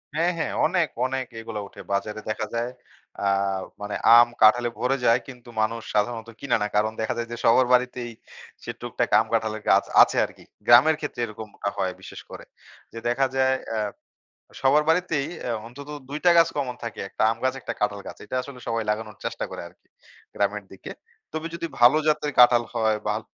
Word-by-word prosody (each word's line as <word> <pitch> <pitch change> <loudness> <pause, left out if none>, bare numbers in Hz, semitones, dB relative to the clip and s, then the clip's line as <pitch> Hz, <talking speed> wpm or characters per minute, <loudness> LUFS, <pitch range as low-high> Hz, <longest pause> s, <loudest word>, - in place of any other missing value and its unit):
হ্যাঁ, 170 +3 +2
হ্যাঁ - - -2
অনেক, 170 -2 +2 0.2
অনেক 130 0 -2
এগুলা 110 -1 -6
উঠে - - -12
বাজারে 105 +2 -2
দেখা 110 0 -2
যায়। 120 +1 -1 0.5
আ - - 0 0.6
মানে 105 0 -4 0.2
আম 120 - +7
কাঁঠালে 120 +3 +6
ভরে 130 +2 +1
যায় 115 +2 +5
কিন্তু 125 -3 -12
মানুষ 115 +1 -1
সাধারণত 115 +2 -1
কিনে 135 -4 0
না। 105 - 0
কারণ 110 +1 +2
দেখা 110 - -1
যায় 115 - -3
যে 120 - -4
সবার 125 +3 +5
বাড়িতেই 125 -1 +1 0.5
সে - - -4
টুকটাক - - -2
আম - - 0
কাঁঠালের 110 -1 0
গাছ - - +5 0.2
আছে - - +4
আরকি। - - -14 0.2
গ্রামের 135 +7 +7
ক্ষেত্রে 145 -5 -5
এরকমটা 105 -2 -6
হয় 95 -1 -1
বিশেষ - - -10
করে। - - -10 0.5
যে 115 - -6
দেখা 135 +3 +2
যায় 130 0 +3
অ্যা 110 -1 -1 0.8
সবার 140 +3 +4
বাড়িতেই 165 -4 +1 0.2
অ্যা 120 - -2
অন্তত 140 +5 -11 0.2
২ 145 +2 -4
টা 175 - +7
গাছ 165 0 +6
কমন 135 -4 -2
থাকে। 115 -3 -6
একটা - - -4
আম 115 - -2
গাছ 130 0 +1
একটা - - -4
কাঁঠাল 105 -1 0
গাছ। - - -8
এইটা 115 - -4
আসলে 135 -1 -10
সবাই 115 0 0
লাগানোর 105 0 -4
চেষ্টা - - -3
করে - - -6
আরকি 85 - -28 0.5
গ্রামের 100 0 -1
দিকে। 95 - -10 0.4
তবে 160 +1 -4
যদি 170 0 -3
ভালো 120 +5 +7
জাতের 150 -1 +1
কাঁঠাল 120 -1 +7
হয় 110 -2 +2
বা 105 - +1
ল - - -20
120 Hz, 190 wpm, -24 LUFS, 110-135 Hz, 0.8 s, আম